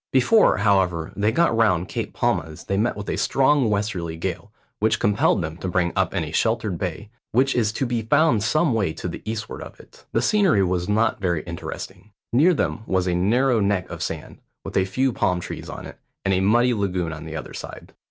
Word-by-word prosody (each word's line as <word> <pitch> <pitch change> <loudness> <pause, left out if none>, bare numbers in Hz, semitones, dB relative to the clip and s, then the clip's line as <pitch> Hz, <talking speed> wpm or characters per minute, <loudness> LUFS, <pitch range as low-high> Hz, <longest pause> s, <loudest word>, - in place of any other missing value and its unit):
Before, 175 - +4
however, 95 -5 +1
they 105 +2 +1
got 165 0 +2
round 95 -6 +2
Cape - - -4
Palmas 80 0 -1
they 100 - -2
met 110 +4 0
with 105 - -6
a - - -2
strong 135 -2 +3
westerly 100 -6 -2
gale, 90 +3 -4 0.3
which 110 +1 +2
compelled 100 -2 +2
them 80 +1 -5
to 95 - -5
bring 90 -1 0
up 95 0 0
in 85 - 0
a 75 - -6
sheltered 110 -1 0
bay, 95 +3 -5 0.2
which 135 +4 +3
is 110 -3 +1
to 135 - -1
be 120 -2 -1
found 140 0 +3
some 155 +6 +2
way 100 -8 0
to - - -5
the 85 - -6
eastward 110 0 -6
of - - -10
it. - - -18
The 115 - +1
scenery 185 - +3
was 90 0 -1
not 110 0 +1
very 85 -5 0
interesting. 85 +4 -7 0.2
Near 165 +8 +5
them 120 - -1
was 95 -1 +1
a 90 - 0
narrow 115 +7 +2
neck 100 -2 0
of - - -7
sand, - - -5 0.3
with - - -7
a 95 - +3
few 130 +7 0
palm 90 -4 +1
trees - - -7
on - - -7
it, - - -11 0.3
and 95 - +2
a 95 - +2
muddy 120 +6 +3
lagoon 90 -6 -1
on 80 - -8
the 80 0 -7
other 75 - -6
side. - - -9
100 Hz, 215 wpm, -23 LUFS, 90-115 Hz, 0.3 s, Near